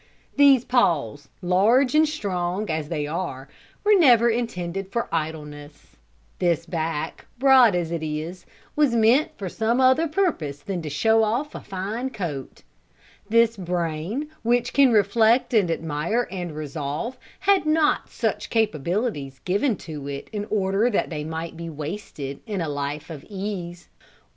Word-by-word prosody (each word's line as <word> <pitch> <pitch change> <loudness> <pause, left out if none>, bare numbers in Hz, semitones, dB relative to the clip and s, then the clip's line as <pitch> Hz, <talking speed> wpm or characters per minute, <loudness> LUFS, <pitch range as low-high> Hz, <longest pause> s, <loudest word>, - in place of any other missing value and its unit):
These 275 -4 +6
paws, 145 - +1
large 220 +9 +3
and 310 0 +4
strong 190 - -2
as 155 -1 -3
they 150 -3 -2
are, 150 -4 -4 0.4
were 420 0 +5
never 240 - +6
intended 195 -5 -3
for 235 - -1
idleness; 150 -2 -5 0.4
this 170 -2 +1
back, 165 -2 -3
broad 255 -5 +6
as 170 -2 -1
it 170 -2 -2
is, 155 +4 -5 0.3
was 295 -5 +3
meant 235 +7 +4
for 195 - -5
some 225 +6 0
other 260 +5 +4
purpose 300 - -1
than 180 +3 -4
to 155 - -5
show 220 +9 +3
off 245 +8 -1
a - - -7
fine 210 +7 -4
coat; 165 - -6 0.7
this 230 +1 +4
brain, 180 - -3
which 240 +1 +1
can 275 -3 +5
reflect 225 +4 +3
and 205 -6 +3
admire 165 +8 -1
and 175 -4 -5
resolve, 150 - -4 0.3
had 390 -4 +3
not 310 -1 +2
such - - -2
capabilities 180 - -1
given 205 +6 +1
to 150 -6 -8
it 140 -1 -6
in 205 -1 -3
order 200 +2 +1
that 205 - -1
they 150 -2 -3
might 160 +2 -5
be 165 0 -6
wasted 150 -3 -6
in 205 -3 -3
a 165 - -2
life 145 +2 -4
of 150 -3 -8
ease. 190 -4 -5
190 Hz, 150 wpm, -24 LUFS, 160-235 Hz, 0.7 s, These